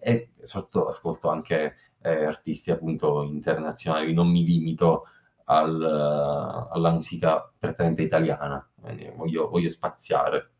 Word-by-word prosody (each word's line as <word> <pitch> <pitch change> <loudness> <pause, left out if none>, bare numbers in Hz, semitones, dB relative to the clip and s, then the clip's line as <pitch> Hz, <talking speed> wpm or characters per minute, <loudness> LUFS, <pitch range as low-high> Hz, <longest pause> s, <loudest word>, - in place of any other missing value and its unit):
e 120 0 0
sotto - - -2
ascolto - - -4
anche, 75 -1 -1 0.3
ehm, 80 -2 +1
artisti 75 - -5
appunto 80 -2 0
internazionali, 80 +1 -2
non 85 +1 +5
mi 85 0 +5
limito 80 -1 +3 0.4
al 80 +1 +4
alla 75 +2 +1
musica 80 -1 0
prettamente 80 -2 0
italiana, 75 -3 0 0.2
ehm, - - -13
voglio 80 0 -2
voglio 85 -1 +1
spaziare. - - -1
80 Hz, 115 wpm, -25 LUFS, 75-85 Hz, 0.4 s, non